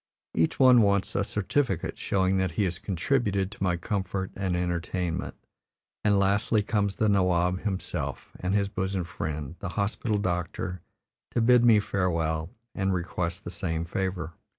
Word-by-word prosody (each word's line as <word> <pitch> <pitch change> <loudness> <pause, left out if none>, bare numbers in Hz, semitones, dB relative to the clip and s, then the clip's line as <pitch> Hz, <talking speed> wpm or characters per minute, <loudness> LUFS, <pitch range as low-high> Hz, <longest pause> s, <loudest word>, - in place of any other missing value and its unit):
Each 80 - +1
one 130 -3 +8
wants 100 -2 +2
a 100 - +1
certificate 105 - -1
showing 95 -1 +1
that 95 -3 0
he 100 - +1
has 90 -3 -1
contributed 100 0 0
to 105 - -13
my 90 -2 +1
comfort 95 0 -2
and 95 -2 -1
entertainment, 90 0 -2 0.7
and 105 -1 +4
lastly 100 +2 +2
comes 100 -1 0
the 110 - +1
nawab 90 -2 +2
himself 95 -3 -4
and 95 +2 0
his 100 -1 +2
bosom 95 -1 -2
friend, 80 -2 -5
the 95 - -4
hospital 105 +1 0
doctor, 90 -1 -2 0.5
to - - +3
bid 120 +1 +5
me 115 -3 +7
farewell 85 -5 0 0.2
and 95 -1 0
request 85 -1 -3
the 85 - -6
same 85 -5 -2
favor. 90 -2 -3
95 Hz, 150 wpm, -27 LUFS, 90-100 Hz, 0.7 s, one